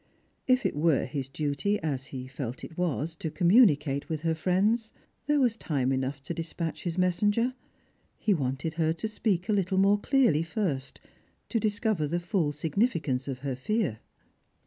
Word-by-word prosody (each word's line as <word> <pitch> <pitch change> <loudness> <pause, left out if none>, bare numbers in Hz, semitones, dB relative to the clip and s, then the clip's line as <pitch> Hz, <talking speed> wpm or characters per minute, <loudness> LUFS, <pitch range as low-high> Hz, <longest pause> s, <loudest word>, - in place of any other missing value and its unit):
If 255 0 +3
it - - 0
were 150 -2 +2
his 135 0 -4
duty, 145 +8 -1
as 135 -4 -2
he 130 -2 -7
felt 130 -2 -6
it 160 - -9
was, 165 -2 -1
to 160 - -3
communi 180 - +5
cate 140 -1 -4
with 155 -2 -2
her 165 0 +1
friends, 200 +7 +1 0.4
there 295 0 +3
was 245 -4 +3
time 135 - -1
enough 135 +1 -2
to 170 - -4
dispatch 165 0 -4
his 170 0 -2
messenger. 205 +7 +2 0.6
He 215 - +2
wanted 140 0 -2
her 160 0 +3
to 165 +6 -3
speak 205 -5 -1
a - - +1
Uttle 190 -1 +1
more 200 +2 +4
clearly 240 - +3
first, 165 -6 -3 0.5
to 230 - +1
discover 210 -6 0
the 170 +4 -1
full 175 -4 0
significance 155 - 0
of 130 -2 -4
her 135 -2 -1
fear. 160 - -1
165 Hz, 170 wpm, -28 LUFS, 140-205 Hz, 0.6 s, communi